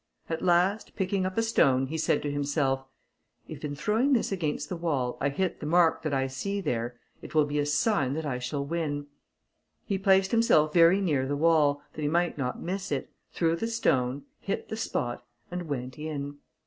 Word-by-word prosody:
At 165 Hz, -, -2 dB
last, 180 Hz, +4 st, +2 dB
picking 190 Hz, -1 st, 0 dB
up 185 Hz, -, -6 dB
a 225 Hz, -, +3 dB
stone, 135 Hz, -, +3 dB
he 155 Hz, +4 st, -4 dB
said -, -, +1 dB
to 145 Hz, -, -1 dB
himself, 140 Hz, -2 st, 0 dB, 0.6 s
"If -, -, -9 dB
in 145 Hz, -1 st, -3 dB
throwing 225 Hz, -, +2 dB
this 235 Hz, -, +1 dB
against 165 Hz, -6 st, -2 dB
the 185 Hz, -, -4 dB
wall, 145 Hz, -8 st, -1 dB
I 140 Hz, -, +2 dB
hit 175 Hz, +5 st, -2 dB
the 150 Hz, -, -5 dB
mark 170 Hz, 0 st, +4 dB
that 155 Hz, -, -2 dB
I 135 Hz, -1 st, +1 dB
see 165 Hz, +10 st, -3 dB
there, 120 Hz, -8 st, -2 dB, 0.2 s
it -, -, -10 dB
will 155 Hz, -1 st, +5 dB
be 145 Hz, 0 st, -2 dB
a 145 Hz, -, 0 dB
sign 145 Hz, -, +1 dB
that 160 Hz, 0 st, -3 dB
I 130 Hz, -4 st, -2 dB
shall 140 Hz, +3 st, -3 dB
win!" 145 Hz, -2 st, -2 dB, 0.8 s
He 195 Hz, -3 st, -1 dB
placed 190 Hz, -1 st, +4 dB
himself 155 Hz, -10 st, +4 dB
very 175 Hz, +3 st, +6 dB
near 145 Hz, -8 st, +1 dB
the 145 Hz, +1 st, -1 dB
wall, 150 Hz, -2 st, +3 dB
that 155 Hz, -, -7 dB
he 145 Hz, -, 0 dB
might 170 Hz, +3 st, +1 dB
not 125 Hz, -3 st, -3 dB
miss 190 Hz, 0 st, -4 dB
it, 140 Hz, -2 st, -2 dB, 0.2 s
threw 165 Hz, -1 st, +1 dB
the 225 Hz, +7 st, -2 dB
stone, 135 Hz, -, +1 dB, 0.2 s
hit 195 Hz, -, -4 dB
the -, -, -3 dB
spot, 120 Hz, -, -3 dB, 0.3 s
and 175 Hz, -1 st, -4 dB
went 130 Hz, -1 st, -4 dB
in. 145 Hz, -2 st, -4 dB
155 Hz, 200 wpm, -28 LUFS, 140-185 Hz, 0.8 s, very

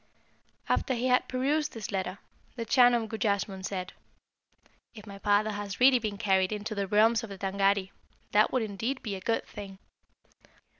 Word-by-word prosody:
"After 260 Hz, -, +1 dB
he 250 Hz, +2 st, -1 dB
had 250 Hz, 0 st, +3 dB
perused 290 Hz, +4 st, 0 dB
this 220 Hz, -3 st, -6 dB
letter, 190 Hz, -1 st, -3 dB, 0.4 s
the 230 Hz, -2 st, -4 dB
Chan 245 Hz, 0 st, +5 dB
of 230 Hz, -2 st, -1 dB
Gujassmunn 200 Hz, -3 st, -2 dB
said, 185 Hz, -2 st, -4 dB, 1.0 s
'If 210 Hz, -2 st, -11 dB
my 200 Hz, -1 st, -10 dB
father 205 Hz, +1 st, +2 dB
has 205 Hz, -1 st, -5 dB
really 255 Hz, 0 st, +6 dB
been 215 Hz, -3 st, -4 dB
carried 190 Hz, -1 st, +2 dB
into 215 Hz, +1 st, -4 dB
the 200 Hz, -2 st, -2 dB
realms 220 Hz, +3 st, +3 dB
of 225 Hz, -, -7 dB
the 195 Hz, -, -8 dB
Tângâri, 195 Hz, 0 st, 0 dB, 0.4 s
that 210 Hz, +1 st, +4 dB
would 255 Hz, -3 st, +1 dB
indeed 225 Hz, +6 st, -3 dB
be 210 Hz, -, -3 dB
a 190 Hz, -, -8 dB
good 225 Hz, +4 st, -1 dB
thing. 200 Hz, -2 st, -9 dB
210 Hz, 170 wpm, -29 LUFS, 195-235 Hz, 1.0 s, really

